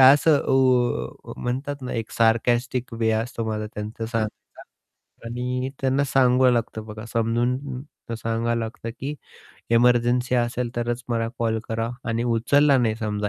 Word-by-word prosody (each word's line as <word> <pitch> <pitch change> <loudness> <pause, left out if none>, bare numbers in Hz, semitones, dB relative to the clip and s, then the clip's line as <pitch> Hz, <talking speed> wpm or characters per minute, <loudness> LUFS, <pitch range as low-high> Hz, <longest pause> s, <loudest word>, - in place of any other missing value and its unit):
असं 145 +3 +7
ओ 130 -2 +1
म्हणतात 135 +4 -3
ना, 125 - -4
एक 115 -1 -3
सारकास्टिक 120 +2 +1
वे 115 -1 +1
असतो 115 +1 -2
माझा 110 -1 -2
त्यांचं 105 +2 -5
सांगायचा. 110 -2 -4 0.7
आणि 125 +2 -2
त्यांना 135 +1 +2
सांगावं 130 -2 +4
लागतं 110 -2 -2
बघा 110 +1 -8
समजून 125 +4 0 0.3
सांगावं 115 +1 -1
लागतं, 115 0 -5
की 140 +3 -3 0.6
एमर्जन्सी 120 +1 +3
असेल 120 0 0
तरच 120 +1 -1
मला 115 -1 0
कॉल 115 -1 +1
करा 115 +1 -1 0.2
आणि 115 +1 0
उचलला 135 +5 +4
नाही 110 -3 +2
समजा 105 -2 -2
120 Hz, 135 wpm, -24 LUFS, 115-125 Hz, 0.7 s, असं